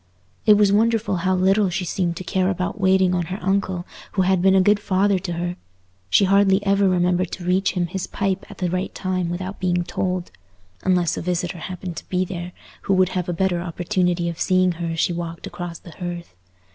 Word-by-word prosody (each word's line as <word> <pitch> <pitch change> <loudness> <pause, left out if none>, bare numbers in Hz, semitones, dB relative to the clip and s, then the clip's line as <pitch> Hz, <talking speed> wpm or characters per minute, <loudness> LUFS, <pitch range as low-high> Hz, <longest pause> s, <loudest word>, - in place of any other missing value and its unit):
It 210 - +8
was 205 -1 +4
wonderful 225 -2 +2
how 185 +2 +1
little 190 +2 +3
she 180 +1 -2
seemed 175 -1 -1
to - - -5
care 185 0 0
about 185 +2 -3
waiting 190 -1 +4
on 175 -1 0
her 185 - -4
uncle, 190 -2 -1 0.3
who 190 - +2
had 185 -1 +2
been 190 +1 +5
a - - +6
good 205 +2 +4
father 195 -1 +2
to 175 -1 -4
her—she 95 - -2
hardly 195 +1 +3
ever 200 0 +3
remembered 180 0 +1
to 180 - -6
reach 185 +2 +2
him 180 -2 0
his 180 +2 -4
pipe 195 -1 -2
at 205 - -11
the 180 -2 -1
right 185 +1 -2
time 185 -2 -1
without 185 +3 -5
being 180 -1 +1
told, 180 0 -3 0.5
unless 180 -3 +1
a - - -2
visitor 175 0 -2
happened 180 -1 -6
to - - -9
be 185 0 +1
there, 175 -1 -6 0.3
who 195 - +1
would 185 -1 +3
have 180 -1 -3
a - - +1
better 175 0 0
opportunity 175 0 -1
of 170 -1 -5
seeing 185 0 +3
her 170 0 -4
as 165 0 -3
she 175 - +2
walked 170 -1 -5
across 175 -1 -6
the 170 - -13
hearth. 175 - -6
185 Hz, 210 wpm, -22 LUFS, 175-190 Hz, 0.5 s, It